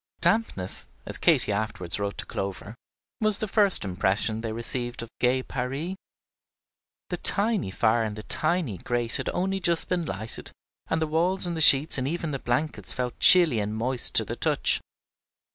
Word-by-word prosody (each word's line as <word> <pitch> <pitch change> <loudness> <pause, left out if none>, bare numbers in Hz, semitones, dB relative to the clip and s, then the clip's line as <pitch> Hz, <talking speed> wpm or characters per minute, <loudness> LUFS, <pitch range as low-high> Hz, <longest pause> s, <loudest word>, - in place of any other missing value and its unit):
Dampness, 155 - -1 0.2
as - - -3
Katy - - +2
afterward 100 -4 -4
wrote 100 0 -4
to - - -6
Clover, 100 +2 -6 0.5
was 215 -2 +3
the 215 - -3
first 200 - +3
impression 100 +4 -2
they 115 -1 -5
received 120 +1 -5
of 115 - -11
"gay 130 +1 0
Paris." 135 +9 -5 1.2
The - - -2
tiny 210 - +3
fire 110 +4 0
in 105 -1 -5
the 105 - -9
tiny 155 - -1
grate 120 +2 -2
had - - -4
only 195 +1 -2
just 170 -2 -1
been 175 -2 -2
lighted, 110 +3 -6 0.4
and 160 0 -1
the - - 0
walls 175 +5 +2
and 175 -1 +3
the 160 - -3
sheets 140 -1 +7
and 130 - -3
even 165 0 -4
the 135 - -4
blankets 130 +6 -2
felt 125 -1 -5
chilly 170 -11 +6
and 105 +1 -4
moist 125 +2 -2
to - - +8
the - - -6
touch. - - 0
125 Hz, 175 wpm, -25 LUFS, 110-170 Hz, 1.2 s, to